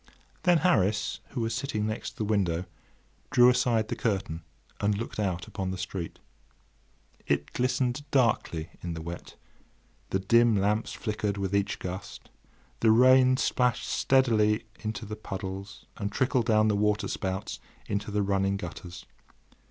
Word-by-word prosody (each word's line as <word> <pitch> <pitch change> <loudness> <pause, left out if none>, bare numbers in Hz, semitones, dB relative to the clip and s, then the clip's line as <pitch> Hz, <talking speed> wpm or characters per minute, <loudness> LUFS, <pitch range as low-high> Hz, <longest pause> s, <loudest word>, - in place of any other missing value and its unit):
Then 180 -2 +4
Harris, 110 - +2
who 125 - -4
was 115 0 -1
sitting 110 -4 -2
next 110 0 -4
the - - -1
window, 95 -5 0 0.6
drew 120 0 +6
aside 120 -3 +2
the - - -3
curtain 95 -7 -2 0.4
and 105 0 +1
looked 115 0 -5
out 95 -4 -1
upon 95 -3 -4
the 95 - -3
street. 90 -1 -5 1.1
It 70 0 0
glistened 125 +2 0
darkly 110 - +1
in 85 -1 -4
the 80 - -6
wet, 85 +1 -8 0.7
the - - +1
dim 115 +4 +4
lamps 105 +3 +1
flickered 105 -2 -2
with 100 -1 -2
each 100 0 +1
gust, 95 +2 -7 0.5
the 115 - +4
rain 130 +3 +6
splashed 125 -2 +1
steadily 110 -5 +3
into 110 +1 -4
the 105 +1 -5
puddles 95 -1 -7
and 100 -1 -3
trickled 125 +1 +1
down 110 -1 +4
the 105 - +2
water 105 0 +1
spouts 95 0 -3 0.3
into 100 +1 -3
the 105 0 0
running 100 0 +1
gutters. 90 -1 -8
105 Hz, 145 wpm, -28 LUFS, 95-115 Hz, 1.1 s, drew